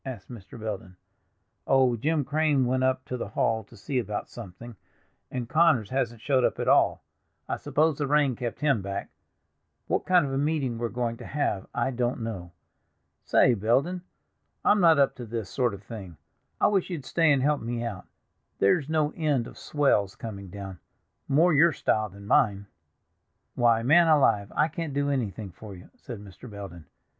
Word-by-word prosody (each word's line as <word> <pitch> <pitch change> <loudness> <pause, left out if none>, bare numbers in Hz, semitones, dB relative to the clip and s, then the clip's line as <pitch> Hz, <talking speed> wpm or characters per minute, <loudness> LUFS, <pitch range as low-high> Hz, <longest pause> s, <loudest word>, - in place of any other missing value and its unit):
asked 125 -5 -8
Mr. 115 0 -11
Belden. 100 -4 -6 0.7
"Oh, 130 -2 +4
Jim 150 +5 0
Crane 150 -2 +2
went 130 +1 0
up 130 0 0
to 125 - -4
the 120 - -4
hall 110 +1 0
to 115 - -17
see 125 +7 -2
about 105 -3 -4
something, 115 +1 -10 0.5
and 125 -2 -4
Connors 155 -8 +3
hasn't 120 -4 -2
showed 130 -2 +2
up - - +1
at - - -3
all; - - +3 0.4
I - - -2
suppose 155 0 +1
the 145 - 0
rain 145 -3 +2
kept 120 +3 -5
him 140 -8 +2
back. 100 +1 -5 0.7
What - - -1
kind 180 -4 +4
of 135 - -4
a 135 - 0
meeting 140 -6 -1
we're 120 0 -1
going 120 -1 -2
to - - -10
have 135 -9 -2
I 135 - -1
don't 120 -1 -1
know. 95 -6 -6 0.7
Say, 125 - +4
Belden, 130 - +1 0.6
I'm 205 -1 +4
not 165 -3 +6
up 140 -1 +3
to 120 - -6
this 110 -3 -5
sort 125 -3 +1
of 100 - -14
thing. 100 -6 -9 0.4
I - - +3
wish 195 -3 +2
you'd 160 -8 -5
stay 165 +1 +3
and 135 -2 +2
help 150 +1 +1
me 120 +1 -3
out—there's 115 - -3
no 155 -2 +1
end 150 -7 0
of - - -11
swells 120 -10 +1
coming 100 -4 -7
down, 95 -2 -8 0.5
more 160 +5 +4
your 160 +3 +5
style 110 -4 0
than 100 +1 -13
mine." 100 -2 +2 0.9
"Why, 115 -2 +3
man 165 +7 +5
alive, 135 -10 +3
I 150 - +3
can't 165 -4 -5
do 145 0 +1
anything 110 -7 -3
for 100 +3 -11
you," 90 - -15
said 125 - -9
Mr. 105 +4 -12
Belden. 95 -7 -9
125 Hz, 180 wpm, -27 LUFS, 105-145 Hz, 0.9 s, not